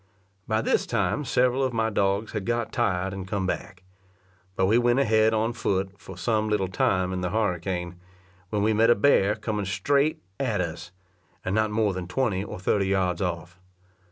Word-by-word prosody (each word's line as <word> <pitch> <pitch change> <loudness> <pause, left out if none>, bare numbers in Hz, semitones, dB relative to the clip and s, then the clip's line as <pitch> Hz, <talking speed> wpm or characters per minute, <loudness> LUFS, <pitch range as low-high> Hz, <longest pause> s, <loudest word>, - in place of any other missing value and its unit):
By 110 0 0
this - - +1
time 150 - 0
several 125 +1 +2
of 130 -2 0
my 110 -1 0
dogs 100 +1 0
had 105 -3 -3
got 120 +1 -1
tired 95 +1 0
and 95 -1 -6
come 95 -1 -2
back; 95 0 -4 0.7
but 95 - +2
we 110 +5 +4
went 120 +1 +2
ahead 110 -4 +3
on 110 +1 0
foot 95 -4 -1
for 95 -2 -11
some 110 +2 0
little 105 -3 +1
time 95 0 +1
in 90 - -3
the 90 - -1
harricane, 90 -4 -2 0.5
when 105 0 0
we 110 +1 +3
met 115 +2 +4
a 120 - +6
bear 105 -3 +3
coming 105 -3 -3
straight 140 +10 +1 0.2
to 120 -7 0
us, 85 +1 -11 0.5
and 95 - -1
not 110 0 +2
more 105 -1 +1
than 90 -1 -5
twenty 100 -1 0
or - - -7
thirty 100 +1 +1
yards 95 -2 0
off. 90 0 -4
100 Hz, 185 wpm, -26 LUFS, 95-110 Hz, 0.7 s, a